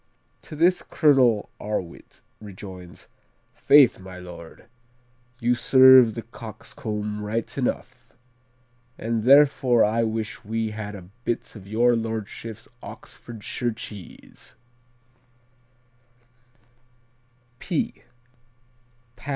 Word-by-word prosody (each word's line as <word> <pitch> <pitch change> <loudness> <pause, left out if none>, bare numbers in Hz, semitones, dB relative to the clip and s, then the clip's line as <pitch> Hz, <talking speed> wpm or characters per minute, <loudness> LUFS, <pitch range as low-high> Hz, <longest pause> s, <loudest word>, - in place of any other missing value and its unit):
"To - - -11
this 175 +4 +3
Colonel 130 -8 +2
Arwit 105 -5 -6 0.2
rejoins: 95 -3 -11 0.5
'Faith, 140 -7 +5
my 95 -1 -11
lord, 85 -2 -11 0.7
you 120 0 +2
served 130 -1 +6
the 115 - -5
coxcomb 105 -2 -6
right 110 +2 -3
enough; - - -4 0.9
and 115 -1 -2
therefore 135 -4 +5
I 110 +2 +1
wish 110 -1 -3
we 110 +1 -2
had 105 -1 -6
a 90 -2 -12
bit 120 - -3
of 100 -3 -12
your 120 +3 +3
lordship's 110 0 -5
Oxfordshire 120 +1 -6
cheese.'" 105 -4 -11
110 Hz, 85 wpm, -24 LUFS, 105-120 Hz, 0.9 s, served